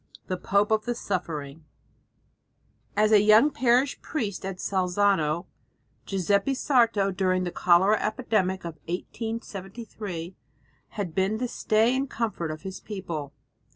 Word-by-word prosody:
XI - - -21
THE 185 - -1
POPE 200 +3 +1
OF 215 -1 +2
THE 240 0 -1
SUFFERING 160 -8 -4 1.3
As 215 +1 +4
a 210 -2 +7
young 215 +8 +6
parish 255 0 +2
priest 215 -11 -3
at 190 -1 -4
Salzano, 180 -3 +1 0.6
Giuseppe 200 +7 +1
Sarto 230 -8 +2
during 185 -1 +1
the 175 - -3
cholera 180 +5 +4
epidemic 215 -6 0
of 165 -2 -6
1873 195 -2 -6 0.6
had 190 -6 -3
been 195 +4 +1
the 250 +2 -2
stay 225 +1 +2
and 270 +1 -1
comfort 215 -8 -2
of 155 0 -6
his 190 -1 -6
people. 170 -9 -6
200 Hz, 130 wpm, -26 LUFS, 180-220 Hz, 1.3 s, a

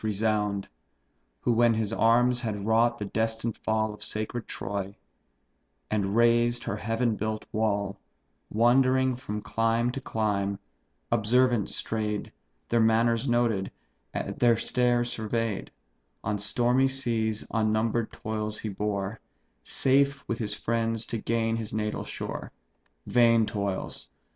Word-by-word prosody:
resound; 105 -1 0 0.7
Who, 120 - +2
when 115 0 +4
his 110 -1 -1
arms 120 +2 +3
had 105 -4 -3
wrought 115 +2 +3
the 105 - -4
destined 110 +2 -1
fall 110 -1 0
Of 105 - -13
sacred 110 +2 -3
Troy, 100 0 -4 1.0
and 100 -1 0
razed 120 0 +3
her - - -3
heaven 115 0 0
built 110 +1 -3
wall, 100 -2 0 0.5
Wandering 130 +3 +3
from 105 -4 -5
clime 115 +1 +1
to 135 - -5
clime, 100 -4 -1 0.5
observant 120 0 +3
stray'd, 105 -2 -3 0.4
Their 120 - +3
manners 115 +2 +3
noted, 115 -5 +1 0.4
and - - -3
their 120 -2 +5
states 120 0 +1
survey'd, 110 -1 -2 0.5
On 105 -1 -1
stormy 120 +5 +2
seas 115 -5 -1
unnumber'd 110 +1 +1
toils 110 0 -4
he 110 - -4
bore, 100 +1 -2 0.4
Safe 140 - +1
with 115 - -2
his 105 -3 -2
friends 115 0 -1
to 115 - -3
gain 115 0 0
his 110 -3 -5
natal 105 0 -2
shore: - - -5 0.5
Vain 115 -2 +4
toils! 100 - -3
110 Hz, 125 wpm, -28 LUFS, 105-120 Hz, 1.0 s, their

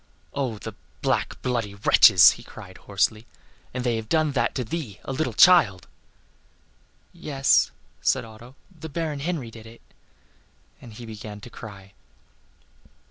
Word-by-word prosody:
"Oh! 130 -6 -2
the - - -8 0.3
black, - - -1
bloody 115 -5 -2
wretches!" 100 - +7
he - - -9
cried, - - -13
hoarsely; 110 +1 -1 0.4
"and 130 - -4
have 120 -2 +1
they 110 - -2
done 155 +7 0
that 135 - -1
to 130 - -1
thee, 115 - -6
a - - -6
little 135 -1 -1
child?" 125 - +5 1.3
"Yes," 135 -2 +2 0.3
said - - +1
Otto, 115 +4 -14 0.2
"the 160 0 -9
Baron 155 -1 -3
Henry 145 -6 -4
did 115 0 -12
it." 115 +1 -15 1.0
And 120 - -12
then 110 - -13
again - - -12
he - - -8
began 105 -1 -9
to 120 - -12
cry. 100 -4 -11
120 Hz, 150 wpm, -24 LUFS, 110-140 Hz, 1.3 s, wretches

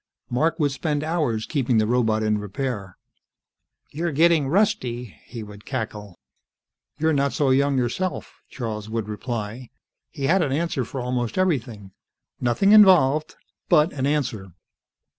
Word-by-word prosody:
Mark 160 +7 +1
would 145 -2 +2
spend 145 +2 -2
hours 150 -9 -1
keeping 130 -6 0
the 110 - +3
robot 110 -2 +1
in 105 -1 +1
repair. 105 -2 -5 0.9
"You're 165 +3 -2
getting 160 -1 +3
rusty," 130 - 0
he 115 -3 -8
would 105 0 -12
cackle. 105 -4 -5 0.8
"You're 160 +1 +1
not 140 -2 +1
so 140 -1 +1
young 140 +1 +2
yourself," 130 +10 -3
Charles 110 -4 -5
would 110 -1 -3
reply. 115 +2 -5 0.4
He 140 - -8
had 180 +7 +3
an 145 -5 0
answer 150 -4 -1
for 135 +2 -5
almost 125 +1 -2
everything. 120 - -1 0.5
Nothing 125 - +2
involved, 165 -8 +6 0.3
but 160 -1 +4
an 135 -1 -1
answer. 115 - -2
130 Hz, 140 wpm, -23 LUFS, 110-155 Hz, 0.9 s, involved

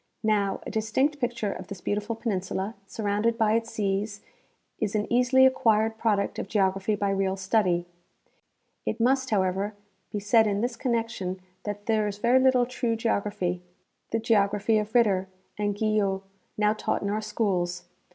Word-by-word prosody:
Now, 205 -3 +1
a - - -5
dis 220 0 -2
tinct 290 +5 +2
picture 235 -5 -1
of - - -9
this 200 -2 -7
beautiful 210 +4 -2
peninsula, 195 -2 -2
surrounded 215 +3 0
by 220 -2 +3
its 230 0 0
seas, 205 -1 -2 0.6
is 215 -1 -1
an 210 0 +1
easily 250 +2 +5
acquired 225 -4 +2
product 205 -3 0
of - - -4
geography 195 0 +1
by 200 -1 0
real 195 -1 0
study. 190 -3 +1 1.0
It - - -3
must, 260 +2 +2
however, 195 0 0 0.4
be 210 - -2
said 220 +2 +4
in 205 0 0
this 240 0 -1
connection 230 -6 -2 0.3
that 205 0 -5
there 215 -2 +2
is 205 -1 -4
very 240 +4 +4
little 260 -1 +4
true 240 -2 -1
geography, 200 -5 -1 0.5
the - - 0
geography 215 -1 +2
of 210 +2 -5
Ritter 195 -6 +3 0.3
and 205 -1 -1
Guyot, 205 -3 +1 0.3
now 210 0 +3
taught 215 - -2
in 200 - -1
our 215 +1 -1
schools. 180 -5 -1
210 Hz, 160 wpm, -27 LUFS, 200-230 Hz, 1.0 s, easily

